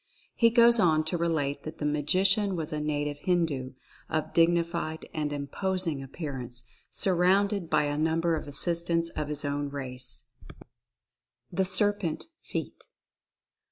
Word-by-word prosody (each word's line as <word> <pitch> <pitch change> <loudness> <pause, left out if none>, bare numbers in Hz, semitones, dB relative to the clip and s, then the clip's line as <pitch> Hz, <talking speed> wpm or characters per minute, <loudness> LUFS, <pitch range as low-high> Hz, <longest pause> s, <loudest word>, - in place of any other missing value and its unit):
He 230 - +4
goes 235 0 +6
on 155 -5 +4
to 160 +3 -2
relate 155 -4 0
that 155 +1 -8
the 150 - -3
Magician 185 +7 +2
was 160 -2 -3
a 150 - -1
native 145 -1 -2
Hindu, 155 -7 0 0.4
of 155 -1 -2
dig 165 0 +5
nified 170 -2 -2
and 150 -2 -2
imposing 160 +2 -1
appearance, 130 -4 -5 0.3
surrounded 190 0 +2
by 155 -1 +3
a 145 0 -1
number 165 +1 +1
of 155 - -5
assistants 170 +3 0
of 150 - -3
his 150 0 -2
own 145 0 -2
race. 130 -3 -4 1.2
THE 190 +2 +1
SERPENT 205 - +2
FEAT. - - -6
160 Hz, 135 wpm, -28 LUFS, 145-180 Hz, 1.2 s, goes